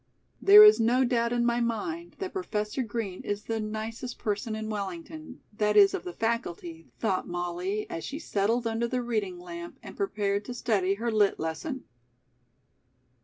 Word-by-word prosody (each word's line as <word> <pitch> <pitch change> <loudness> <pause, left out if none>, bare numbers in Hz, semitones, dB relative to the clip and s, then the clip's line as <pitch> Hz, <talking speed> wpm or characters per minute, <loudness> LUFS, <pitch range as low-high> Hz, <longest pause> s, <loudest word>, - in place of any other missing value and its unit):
"There 415 +2 +10
is 425 - +8
no 245 +3 +3
doubt 235 -1 +1
in 240 0 +1
my 235 0 +2
mind 325 +10 -3
that 380 -1 -5
Professor 215 - -2
Green 220 -5 -4
is 205 0 -3
the 225 0 -2
nicest 220 +3 -5
person 215 +1 -2
in 220 0 -4
Wellington, 300 - -6
that 210 0 +2
is, 200 -1 +7
of - - -4
the 180 - -4
faculty," 175 -8 -3
thought 195 -5 -1
Molly 175 +4 -3
as 165 - -5
she 280 - -5
settled 230 -4 0
under 225 +1 0
the 250 +1 -2
reading 215 -6 -2
lamp, 170 -1 -8
and - - -10
prepared 200 0 -1
to 245 - -6
study 200 -6 +1
her 230 +3 -2
Lit. 210 -2 +2
lesson. 160 - -4
220 Hz, 170 wpm, -28 LUFS, 200-240 Hz, -, There